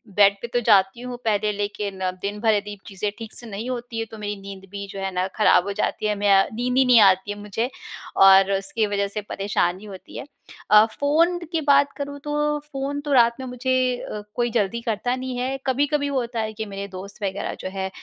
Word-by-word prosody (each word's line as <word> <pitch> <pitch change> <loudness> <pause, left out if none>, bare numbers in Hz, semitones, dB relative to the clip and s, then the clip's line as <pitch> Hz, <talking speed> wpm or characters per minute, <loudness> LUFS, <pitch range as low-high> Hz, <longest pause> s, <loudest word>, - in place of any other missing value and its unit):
Bed 200 -1 +6
पे 235 - -4
तो 245 - +3
जाती 200 0 +3
हूँ 250 -1 -6
पहले, 210 -1 +1
लेकिन 205 -1 -4 0.2
दिन 205 +1 -3
भर 220 0 +3
यदि 205 0 -2
चीज़ें 205 +1 -3
ठीक 225 -1 -8
से 240 - -8
नहीं 220 +4 -5
होती 240 -2 -5
हैं, 225 - -2
तो 220 - -9
मेरी 205 0 -4
नींद 195 -1 -9
भी 200 0 -5
जो 195 0 -8
है 195 - -2
ना 180 +1 -1
ख़राब 210 -4 +5
हो - - -1
जाती 215 - -2
है, 210 - +1
मैं 205 0 +2
अ, 195 0 +5
नींद 250 +3 -1
ही 265 - +6
नहीं 245 -2 +7
आती 190 0 +4
है 205 - -5
मुझे, 210 +4 -3 0.5
और 195 0 +7
उसकी 195 +3 0
वजह 200 0 0
से 210 +1 -4
परेशानी 195 -1 -1
होती 195 -3 -10
है। - - -6 0.5
अ, 210 +1 +8
फ़ोन 330 +5 +3
की 325 -2 0
बात 280 -1 +4
करूँ, 285 0 -5
तो 295 0 -1
फ़ोन 285 -1 -4
तो 290 -1 -2
रात 235 -2 +5
में 260 - -5
मुझे 250 +1 -3 0.3
अ, 210 - -6
कोई 240 0 +1
जल्दी 225 +1 0
करता 230 +2 -1
नहीं 255 -1 -5
है। 260 +2 -2
कभी-कभी 285 +2 +1
होता 245 -4 -2
है 220 0 -3
कि 220 0 -5
मेरे 200 -1 -6
दोस्त 195 +2 -10
वग़ैरह 195 +1 -2
जो - - -5
हैं, 190 0 -4
215 Hz, 225 wpm, -23 LUFS, 200-250 Hz, 0.5 s, अ